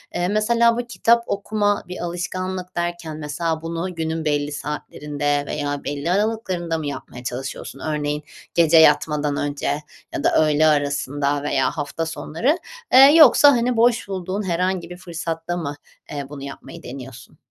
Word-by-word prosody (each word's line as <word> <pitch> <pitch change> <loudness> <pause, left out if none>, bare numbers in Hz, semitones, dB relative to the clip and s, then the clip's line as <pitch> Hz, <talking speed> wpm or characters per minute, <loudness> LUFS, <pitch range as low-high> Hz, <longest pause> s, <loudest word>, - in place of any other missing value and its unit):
Eee, 175 0 0
mesela 230 +3 +3
bu 245 0 -3
kitap 235 +3 +3
okuma 205 0 0
bir 180 - -6
alışkanlık 185 +1 -4
derken 175 -2 -3
mesela 160 +2 -2
bunu 170 +2 -4
günün 160 0 -3
belli 145 -1 0
saatlerinde 145 0 -3
veya 145 -1 -3
belli 145 +4 -2
aralıklarında 185 -5 -1
mı 150 -2 -4
yapmaya 125 -3 -7
çalışıyorsun? 130 +2 -6
Örneğin 150 -1 -2 0.3
gece 165 -1 +5
yatmadan 150 -2 +4
önce 145 0 -2 0.5
ya - - -3
da - - +4
öğle 155 +1 +3
arasında 145 -1 0
veya 135 -3 +1
hafta 145 +3 -3
sonları? 225 - -1 0.4
Eee, 260 - +9 0.2
yoksa, 290 -1 +8
hani, 240 -1 +1
boş 235 -2 +3
bulduğun 190 +1 -3
herhangi 180 0 -1
bir 180 - -8
fırsatta 170 -1 -4
mı, 145 -4 -4 0.4
eee, 145 -2 -4
bunu 140 -2 -8
yapmayı 150 +4 -9
deniyorsun? 130 -1 -10
165 Hz, 145 wpm, -22 LUFS, 145-185 Hz, 0.5 s, Eee